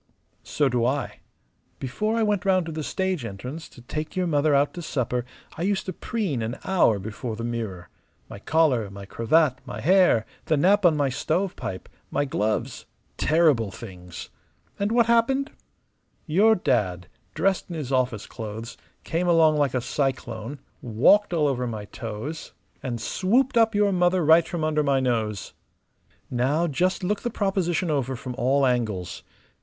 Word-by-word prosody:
"So 145 - 0
do 120 -2 +1
I. 135 +4 -1 0.6
Before 215 - -2
I 225 - +2
went 210 -2 +1
round 185 -3 +2
to 165 - -5
the 155 0 -4
stage 190 -1 -2
entrance 125 +9 -7
to 120 - -15
take 155 +5 -5
your 185 -1 +1
mother 150 -2 +2
out 140 +1 +2
to 175 - -6
supper 125 -6 -2 0.3
I - - -5
used 195 +2 0
to 185 - -4
preen 190 - -2
an 115 +4 -3
hour 180 - +3
before 110 +4 -5
the 115 - -6
mirror. 110 -7 -4 0.4
My - - -9
collar, 130 -6 +2
my 100 0 -9
cravat, 130 +6 +2
my - - -7
hair, 180 - +4 0.2
the 155 - +2
nap 190 +5 +4
on 155 -3 +2
my 140 -2 +2
stovepipe, 160 - -2 0.2
my 145 - 0
gloves 110 -5 -2 0.3
terrible 150 -9 +3
things! 90 -4 -10 0.5
And 200 +2 0
what 235 0 +4
happened? 235 +4 +2 0.7
Your 205 +8 +4
dad, 95 - 0 0.3
dressed 195 -1 0
in 170 - -5
his 145 -5 -5
office 125 -5 0
clothes, 110 +1 -7 0.3
came 175 +2 -1
along 160 -3 +5
like 140 -3 +1
a 125 - +1
cyclone, 130 -2 -3 0.2
walked 135 - +4
all 160 -4 +2
over 125 -3 -1
my 110 -3 -5
toes, 115 +10 -7 0.3
and 120 -3 -4
swooped 235 - +1
up 225 -2 +4
your 205 -1 +3
mother 180 -2 +2
right 160 +2 +6
from 170 -3 -3
under 155 -1 +1
my 140 -2 +2
nose. 110 -6 -1 0.8
Now 135 +7 +1
just 180 +5 0
look 200 +3 -1
the 240 - -2
proposition 190 -5 0
over 135 -3 -1
from 125 +1 -6
all 135 +2 +3
angles. 110 -8 -1
145 Hz, 165 wpm, -25 LUFS, 120-180 Hz, 0.8 s, right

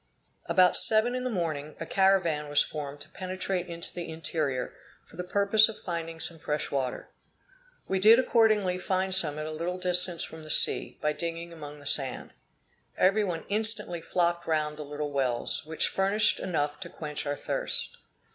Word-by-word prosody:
About 180 -1 +5
seven 220 +2 +5
in 255 0 -3
the 255 - -2
morning, 155 -7 -3
a - - -4
caravan 175 -6 +2
was 145 - +4
formed 145 -2 -7
to - - -11
penetrate 185 -1 -4
into 170 -1 -5
the 175 -2 -6
interior, 155 -5 -3 0.3
for - - -18
the 180 - -5
purpose 200 +4 +4
of 220 - -9
finding 165 -1 -5
some 165 0 -4
fresh 150 0 -3
water. 130 -3 -3 0.8
We 190 - 0
did 220 +4 +7
accordingly 215 -7 +2
find 190 +1 -1
some 160 -6 +2
at 155 - -4
a 155 - -5
little 170 +3 -4
distance 180 -1 0
from 160 - -9
the 155 - -12
sea, - - +4
by 150 0 +1
digging 170 +2 -5
among 150 -2 -10
the 145 - -15
sand. 135 -3 +1 0.6
Every 195 +3 +3
one 175 -5 -4
instantly 210 -4 0
flocked 170 0 0
round 155 -2 0
the 150 - -6
little 145 0 -5
wells, 130 0 0
which 160 0 +1
furnished 200 +2 +1
enough 150 -4 -2
to 170 - -8
quench 150 -2 -6
our 145 - -1
thirst. - - -3
170 Hz, 175 wpm, -28 LUFS, 150-190 Hz, 0.8 s, did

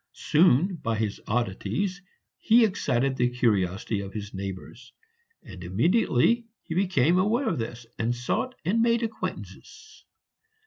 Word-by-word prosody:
Soon, 170 +3 +3
by 115 -7 -2
his 105 -2 -3
oddities, 120 - -2 0.4
he 230 +1 +5
excited 135 - 0
the 125 -1 +1
curiosity 105 -4 0
of 100 -1 -7
his 105 -1 -6
neighbors; 100 +6 -8 0.5
and 95 - -11
immediately 175 - +2 0.2
he - - -6
became 180 -2 +2
aware 225 +7 +1
of 215 - -1
this, 115 +1 -5
he 115 +1 0
sought 125 - -2
and 215 +7 +2
made 235 0 +2
acquaintances. 225 -1 -7
125 Hz, 130 wpm, -26 LUFS, -, 0.5 s, he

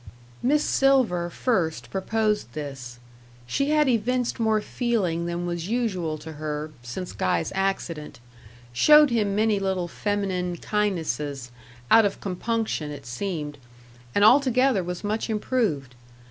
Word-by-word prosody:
Miss 295 +4 +2
Silver 250 -11 +2
first 175 -6 -1
proposed 210 - -1
this. 135 -5 -7 0.5
She 275 - -1
had 300 -1 +3
evinced 245 +1 0
more 220 -1 +2
feeling 200 -8 -1
than 175 0 -3
was 175 -1 -3
usual 195 -9 -1
to 155 +1 -9
her, 150 0 -3
since 125 +10 -6
Guy's 85 -2 -1
accident; 180 -8 -2 0.5
showed 300 - +6
him 210 -4 +1
many 215 -1 +2
little 190 -2 -1
feminine 185 -2 -2
kindnesses 160 - -2 0.4
out 225 - +8
of 200 - -1
compunction, 200 -4 -2
it 145 -2 -8
seemed; 150 +2 -4 0.6
and 205 - +5
altogether 255 -3 +4
was 180 +2 -5
much 215 +3 -2
improved. 210 - -1
195 Hz, 125 wpm, -25 LUFS, 155-225 Hz, 0.6 s, out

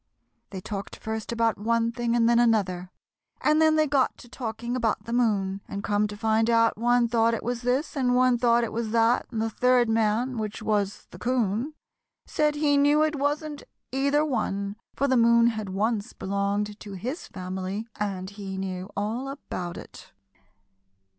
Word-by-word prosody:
They 190 -2 -7
talked 200 0 -6
first 220 0 -5
about 230 -2 +1
one 230 +2 +1
thing 235 0 -1
and 230 -1 +3
then 235 0 +4
another, 195 -6 +1 0.5
and 305 +1 +3
then 315 0 +5
they 310 0 +4
got 275 -3 +1
to - - -14
talking 235 0 -4
about 230 -4 0
the 230 - -5
moon, 200 -5 +1
and 200 0 -5
come 205 0 +1
to 205 0 -8
find 220 +1 +2
out 230 -1 +4
one 240 +1 +3
thought 230 0 +2
it - - -6
was 240 0 -2
this, 255 +6 0
and 250 -3 +2
one 250 -1 +4
thought 235 0 +3
it 230 - -2
was 225 0 -2
that, 230 +1 +3
and 230 - -4
the 225 0 0
third 250 +1 +3
man, 225 +3 +1
which 215 -1 -4
was 205 -2 -1
the - - -11
'Coon, 245 +3 0 0.5
said 300 -1 +1
he 295 -1 +2
knew 290 +2 +4
it 310 0 0
wasn't 290 +1 -2 0.3
either 280 +3 +2
one, 200 -7 -2 0.2
for 280 - +1
the 260 - +2
moon 235 0 +5
had 215 -3 -4
once 210 +3 -1
belonged 200 +2 -2
to 205 - -9
his 250 - -5
family 190 +3 -5
and 195 -2 -3
he 195 -2 -6
knew 185 -1 -4
all 225 +6 -2
about 185 -10 -6
it. - - -12
230 Hz, 180 wpm, -26 LUFS, 205-250 Hz, 0.5 s, then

